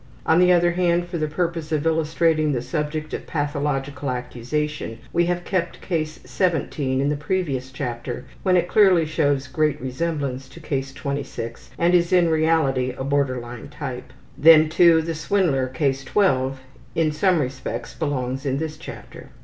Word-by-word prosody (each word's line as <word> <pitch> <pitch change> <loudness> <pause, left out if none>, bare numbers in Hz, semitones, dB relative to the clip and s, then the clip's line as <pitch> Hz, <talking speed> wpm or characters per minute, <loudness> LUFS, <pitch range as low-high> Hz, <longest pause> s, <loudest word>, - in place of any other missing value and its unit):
On 160 +2 +4
the 180 0 +5
other 175 -1 +4
hand, 175 0 +1
for 175 -1 -4
the 155 - 0
purpose 165 0 -2
of 155 -1 0
illustrating 160 -1 +2
the 120 - -1
subject 155 0 -3
of - - -5
pathological 145 -2 -2
accusation 125 +1 -3 0.2
we 175 0 +2
have 175 0 -1
kept 180 -3 -2
Case 155 -3 -3
17 145 -6 0
in 140 +1 +1
the 150 - 0
previous 145 -5 -2
chapter 120 -2 -5 0.2
when 185 -1 +3
it 175 0 +1
clearly 185 -4 +5
shows 145 -3 +1
great 150 +2 0
resemblance 135 -1 -3
to - - -13
Case 135 -4 -3
26 140 -4 -5
and 170 +1 +2
is 175 0 +3
in 175 -2 +4
reality 150 -6 +2
a - - -3
border 140 -2 +1
line 120 0 -8
type. 130 -4 -7 0.2
Then, 155 +2 +7
too, 165 0 +5
the 165 +1 -3
swindler, 155 -5 +1
Case 135 +1 -1
12, 135 -6 +1 0.4
in 160 -2 +2
some 175 +3 +2
respects 130 -2 -4
belongs 135 -4 -2
in 135 -2 -1
this 155 0 -4
chapter. - - -10
150 Hz, 165 wpm, -23 LUFS, 135-170 Hz, 0.4 s, Then